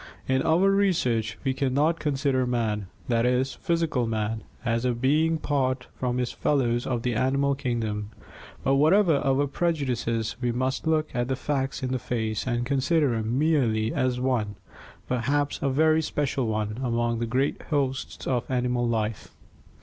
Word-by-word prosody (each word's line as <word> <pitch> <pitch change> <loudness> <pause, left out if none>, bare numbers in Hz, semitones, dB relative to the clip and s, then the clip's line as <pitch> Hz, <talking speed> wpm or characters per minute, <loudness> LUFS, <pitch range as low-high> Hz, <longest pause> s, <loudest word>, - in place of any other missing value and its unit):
In 130 0 +2
our 175 +7 +3
research 125 - +1
we 135 -2 +1
can 130 -1 -1
not 160 +4 +2
consider 140 -4 0
man, 110 -5 -1 0.2
that 115 -2 +2
is, 125 +2 +1
physical 165 -9 0
man, 110 0 -2 0.2
as 115 0 0
a 125 -1 +1
being 150 +7 +2
apart 130 -4 -1
from 125 -1 -1
his 125 -1 -1
fellows 120 -4 0
of 120 -2 -1
the 125 - 0
animal 135 +4 +1
kingdom; 115 -6 -2 0.5
but 135 0 +3
whatever 165 +2 +4
our 135 +1 +2
prejudices 130 -8 -1
we 120 -1 +1
must 130 +5 -2
look 155 -1 +1
the 120 +2 0
facts 135 -1 -2
in 130 - -1
the 130 - 0
face 110 -1 -2
and 120 -1 0
consider 140 +1 +2
him 115 +2 -1
merely 125 -8 +2
as 125 -1 0
one, 120 -5 0 0.5
perhaps 140 +4 0
a 140 - +1
very 155 +3 +3
special 140 -5 -1
one, 110 +1 -2
among 120 -2 0
the 115 - -1
great 130 +4 0
hosts 135 -4 -2
of 125 -3 -1
animal 125 -1 0
life. 110 -2 -2
130 Hz, 160 wpm, -26 LUFS, 115-140 Hz, 0.5 s, whatever